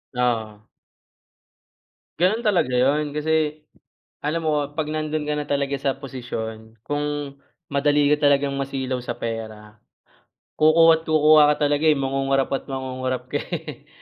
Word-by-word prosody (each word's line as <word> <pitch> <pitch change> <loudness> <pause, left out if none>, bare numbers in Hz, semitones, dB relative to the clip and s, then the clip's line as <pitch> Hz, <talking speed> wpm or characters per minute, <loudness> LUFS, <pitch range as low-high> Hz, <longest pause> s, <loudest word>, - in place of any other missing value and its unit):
Oo. 110 -4 -2 1.5
Ganon 195 +7 +2
talaga 180 - +1
yun 145 +4 +1
kasi 155 0 0 0.6
alam 160 +3 -2
mo 145 -2 -1
pag 155 -1 -2
nandun 155 0 -2
ka 150 0 -2
na 145 - -3
talaga 140 -1 -1
sa 135 0 -1
posisyon, 110 -4 -6
kung 145 -1 -3 0.3
madali 145 +1 +2
ka 150 -1 +3
talagang 140 -1 +2
masilaw 130 -2 -3
sa 120 -1 -5
pera, 110 -2 -7 0.8
kukuha't 160 +1 +5
kukuha 150 -1 +5
ka 150 - 0
talaga 145 +2 +2
eh 150 - +5
mangungurap 135 0 0
at 135 - -3
mangungurap 130 -1 -4
ka - - 0
eh - - -7
140 Hz, 135 wpm, -23 LUFS, 130-150 Hz, 1.5 s, kukuha't